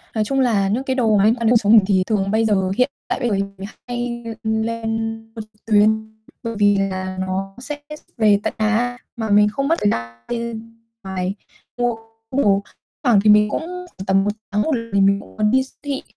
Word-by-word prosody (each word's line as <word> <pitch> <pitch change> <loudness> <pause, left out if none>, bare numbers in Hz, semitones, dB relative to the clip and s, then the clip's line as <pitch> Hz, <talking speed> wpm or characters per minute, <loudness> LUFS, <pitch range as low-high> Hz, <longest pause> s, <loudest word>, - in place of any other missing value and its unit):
Nói 215 - +1
chung 270 +5 0
là 210 -6 +2
những 235 +6 0
cái 260 -1 -1
đồ 220 -5 +3
mà 195 - +3
liên 225 +3 +4
quan 235 -2 -1
đến - - +5
cuộc 240 - +4
sống 215 0 +3
mình 210 -4 +7
thì 190 -2 +3
thường 200 -3 0
bây 220 +1 +2
giờ, 190 -3 +2
hiện 255 +2 +3 0.2
tại - - -2
bây 245 -3 0
giờ 205 - +1
thì 195 - +1
mình 195 0 -9 0.2
hay 240 -1 -3 0.2
lên 225 0 -2 0.2
mua 220 - -5
trực 215 0 -17
tuyến, 220 0 +2 0.3
bởi 230 -1 -3
vì 205 -1 +4
là 185 -1 -2
nó 190 +1 -3
sẽ 290 +3 -6 0.2
ship 300 - -22
về 210 -3 +4
tận - - -1
nhà 230 +3 +1 0.2
mà 220 -2 -3
mình 210 +1 +5
không 275 +6 -2
mất 330 - +3
thời 205 - +3
gian 115 0 -4
bên 230 -1 -5 0.3
ngoài 190 0 -3 0.4
mua 245 -1 +1 0.4
đồ. 200 -7 +3 0.4
Thoảng 240 -7 +5
thì 215 - +4
mình 210 0 +6
cũng - - -2
khoảng 360 - -8
tầm 195 0 +3
1 205 - +1 0.2
tháng 210 - +1 0.3
mình 200 0 +4
cũng - - -16
muốn 210 0 +2
đi 260 0 +3
s 265 - -16
thị 280 -2 -3
220 Hz, 225 wpm, -20 LUFS, 200-235 Hz, 0.4 s, mình